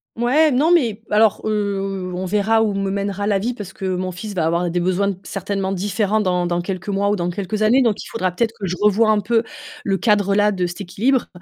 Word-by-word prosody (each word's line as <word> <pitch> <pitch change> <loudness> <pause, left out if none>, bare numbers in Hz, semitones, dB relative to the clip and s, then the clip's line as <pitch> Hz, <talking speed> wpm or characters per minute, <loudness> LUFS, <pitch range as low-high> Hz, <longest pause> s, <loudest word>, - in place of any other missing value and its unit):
mouais. 275 +7 +3
Non, 290 +7 +3
mais 235 -11 +2
alors, 215 0 +3
heu, 195 -3 -2
on 185 +1 -3
verra 210 +4 +2
où 210 -2 0
me 195 0 -1
mènera 200 0 -2
la 205 -2 +2
vie 235 +5 -2
parce 205 -5 -8
que 190 - -7
mon 185 0 -2
fils 205 +4 -7
va 165 -4 0
avoir 170 +1 0
des 175 - -1
besoins 185 +3 0
certainement 195 0 -3
différents 205 +2 0
dans 180 -3 0
dans 175 0 -1
quelques 185 +1 -5
mois 200 0 +1
ou 205 - +2
dans 175 -2 -2
quelques 200 +4 -4
années 240 +5 +4
donc 220 -4 0
il - - -11
faudra 185 -5 -2
peut-être 225 +5 0
que 195 - -3
je 180 - -2
revois 215 +1 +4
un 210 - +3
peu, 225 +3 +1 0.4
le 195 -1 +1
cadre, 205 -2 +2
là, 210 0 +3
de 185 -3 -1
cet 175 +3 -6
équilibre. 235 +8 0
200 Hz, 235 wpm, -20 LUFS, 185-215 Hz, 0.4 s, années